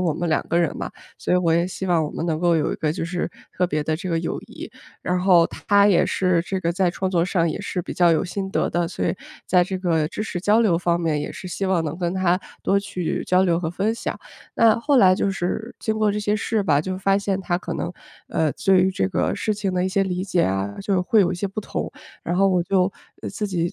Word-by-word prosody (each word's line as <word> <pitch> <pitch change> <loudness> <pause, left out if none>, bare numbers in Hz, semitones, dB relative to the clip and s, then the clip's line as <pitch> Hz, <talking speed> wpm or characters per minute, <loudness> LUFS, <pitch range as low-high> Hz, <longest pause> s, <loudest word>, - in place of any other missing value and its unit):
我 175 -4 +1
们 170 +3 -3
2 155 - 0
个 170 - +2
人 170 -2 0
嘛。 - - -4 0.3
所 - - -2
以 180 - +5
我 170 -2 +2
也 170 +1 +2
希 190 +1 -5
望 170 -3 +2
我 150 - -4
们 165 - -4
能 160 -2 0
够 175 0 +3
有 150 - 0
一 - - -2
个 155 -1 -1
就 165 - -3
是 175 0 -3 0.2
特 180 - +1
别 155 -3 -1
的 155 +1 -1
这 185 +3 -6
个 165 - +1
友 165 - -3
谊。 - - -10 0.3
然 180 0 0
后 180 -2 +5
她 200 0 +2
也 195 -4 +4
是 180 -3 +1
这 190 +1 -3
个 170 -2 0
在 180 0 +1
创 185 +2 -2
作 175 -2 +2
上 170 -2 +1
也 - - -4
是 190 -2 -3
比 - - -6
较 175 -2 +4
有 160 - +2
心 190 +1 -4
得 - - 0
的， 175 -1 0
所 175 - -4
以 - - 0 0.3
在 180 -1 +4
这 185 +1 -4
个 165 -4 +1
知 210 - -4
识 200 -4 -4
交 210 +4 +3
流 205 -7 +3
方 170 0 +1
面， 160 -3 0
也 145 - -4
是 185 - -8
希 195 +2 -3
望 185 -3 +1
能 155 0 -3
跟 175 -1 -1
她 180 -1 +2 0.2
多 200 - +2
去 185 -4 -3
交 185 +1 +3
流 170 -3 +2
和 170 -2 -2
分 200 +6 -1
享。 230 - -4 0.4
那 230 -1 +4
后 285 +4 +2
来， 185 -6 +6
就 195 - 0
是 190 +5 -3
经 220 0 -2
过 215 -1 +3
这 210 - -2
些 210 0 0
事 215 0 0
吧， 145 -6 +3
就 185 +3 -4
发 195 +1 +2
现 200 -1 -1
她 175 -2 -1
可 - - -5
能， 175 - -3 0.4
呃， 155 -3 0
对 190 -2 +3
于 190 - +2
这 95 - -1
个 - - 0
事 215 - -1
情 200 -2 -2
的 180 - +1
一 - - +1
些 195 +1 +1
理 180 -1 -2
解 180 -3 +1
啊， 95 +1 -2
就 200 0 -1
是 185 - +2
会 210 +4 +3
有 185 -2 +2
一 - - -2
些 180 +3 -2
不 195 +3 -5
同。 - - -4 0.3
然 175 +1 -2
后 195 - +4
我 180 -2 +2
就 185 +1 +1 0.3
呃， - - -4
自 210 - -3
己 175 -3 -1
180 Hz, 295 characters per minute, -23 LUFS, 170-195 Hz, 0.4 s, 来